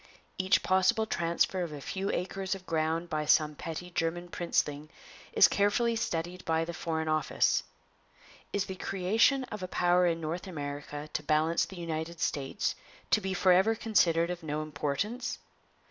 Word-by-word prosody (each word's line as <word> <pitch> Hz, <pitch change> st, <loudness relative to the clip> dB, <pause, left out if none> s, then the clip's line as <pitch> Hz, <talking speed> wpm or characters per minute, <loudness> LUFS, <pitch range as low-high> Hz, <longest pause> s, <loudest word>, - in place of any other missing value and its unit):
Each 185 Hz, 0 st, +3 dB
possible 190 Hz, +4 st, +3 dB
transfer 170 Hz, -1 st, 0 dB
of 170 Hz, -3 st, -3 dB
a 150 Hz, -, -6 dB
few 190 Hz, +7 st, -3 dB
acres 190 Hz, +1 st, -2 dB
of 190 Hz, -1 st, -11 dB
ground 160 Hz, +1 st, 0 dB
by 155 Hz, -2 st, -2 dB
some 150 Hz, 0 st, +4 dB
petty 165 Hz, +4 st, -6 dB
German 175 Hz, +1 st, -2 dB
princeling 150 Hz, -4 st, -1 dB, 0.4 s
is -, -, +7 dB
carefully 230 Hz, +4 st, +2 dB
studied 180 Hz, -5 st, -3 dB
by 160 Hz, 0 st, +1 dB
the 170 Hz, -, -5 dB
Foreign 160 Hz, -1 st, -2 dB
Office. 155 Hz, -1 st, +2 dB, 0.9 s
Is 200 Hz, 0 st, 0 dB
the 190 Hz, -, -5 dB
creation 195 Hz, +9 st, +2 dB
of 210 Hz, -, -5 dB
a 185 Hz, -, -3 dB
power 180 Hz, 0 st, +3 dB
in 165 Hz, -1 st, 0 dB
North 165 Hz, +4 st, -4 dB
America 145 Hz, -2 st, -5 dB
to -, -, -1 dB
balance 155 Hz, +2 st, +2 dB
the 190 Hz, -, -11 dB
United 165 Hz, 0 st, -4 dB
States 140 Hz, -4 st, -1 dB, 0.4 s
to 215 Hz, -, +4 dB
be 190 Hz, -1 st, -2 dB
forever 190 Hz, +4 st, +4 dB
considered 175 Hz, -7 st, +2 dB
of 180 Hz, 0 st, -5 dB
no 155 Hz, -1 st, -3 dB
importance? 155 Hz, -, -2 dB
170 Hz, 160 wpm, -30 LUFS, 155-190 Hz, 0.9 s, is